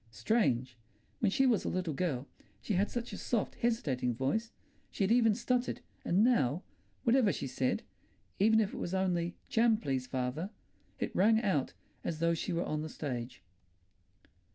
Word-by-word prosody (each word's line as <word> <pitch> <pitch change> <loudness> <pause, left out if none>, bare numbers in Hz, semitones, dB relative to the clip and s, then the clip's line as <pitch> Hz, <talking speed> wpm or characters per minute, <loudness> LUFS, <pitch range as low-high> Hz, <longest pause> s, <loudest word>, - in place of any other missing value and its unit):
Strange! 120 - 0 0.4
When 215 - +3
she 270 +7 +3
was 235 -6 +3
a - - -1
little 180 -4 -1
girl 140 -4 -2 0.3
she 215 - -3
had 195 +3 +2
such 240 -1 -4
a - - -5
soft, 230 -4 -1
hesitating 135 - 0
voice; 220 - -1 0.4
she - - -2
had 195 - +2
even 230 -3 +5
stuttered, 250 +1 -1 0.2
and 185 +5 +3
now, 175 - +2 0.4
whatever 235 -3 +4
she - - -4
said—even 160 - -1
if 210 -2 0
it - - -6
was 175 - -2
only 175 -2 0
"Jam, 225 -1 +4
please, 135 - -2
father"—it 130 - -5
rang 220 +4 +5
out 150 - +1 0.3
as 165 - -2
though 170 +1 +2
she 165 - -2
were 170 0 0
on 155 0 -2
the 155 - -5
stage. 125 - -5
180 Hz, 160 wpm, -32 LUFS, 135-220 Hz, 0.4 s, even